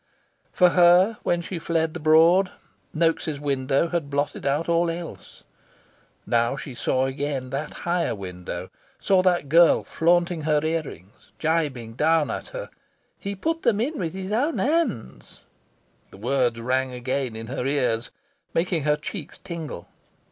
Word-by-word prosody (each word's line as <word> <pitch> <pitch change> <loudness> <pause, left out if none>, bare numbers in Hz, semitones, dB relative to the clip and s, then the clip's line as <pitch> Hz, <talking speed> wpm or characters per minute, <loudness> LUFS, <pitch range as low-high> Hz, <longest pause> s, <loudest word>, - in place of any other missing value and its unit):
For 180 -1 +5
her, 180 +5 +5
when 175 0 0
she 180 0 -5
fled 160 -1 0
the 175 - -5
Broad, 165 +5 +5 0.4
Noaks' 165 -2 0
window 140 +2 0
had 170 -4 -2
blotted 145 0 -2
out 145 +4 0
all 170 0 +2
else. 170 0 -8 0.8
Now 120 +3 +1
she 135 -1 -7
saw 130 +1 0
again 135 -1 -3
that 140 +3 -3
higher 175 0 0
window, 90 -3 -7 0.3
saw 190 -2 +3
that 180 -5 +2
girl 165 +3 +5
flaunting 175 0 +1
her 150 0 +2
ear 160 +1 +1
rings, 100 - -13
gibing 145 -8 -1
down 155 +4 +2
at - - -5
her. - - -7 0.5
"He 200 0 -4
put 325 - -2
them 215 -3 +2
in 280 +6 -1
with 165 -3 -3
his 190 +1 -5
own 280 +9 +1
hands!" 195 - -2 0.7
the - - -14
words 120 +1 0
rang 130 +2 0
again 125 -1 -3
in 115 0 -6
her 125 +2 -3
ears, 125 -5 0 0.5
making 170 -1 +1
her 150 0 +3
cheeks 150 +2 -7
tingle. 160 - -7
155 Hz, 150 wpm, -24 LUFS, 130-175 Hz, 0.8 s, For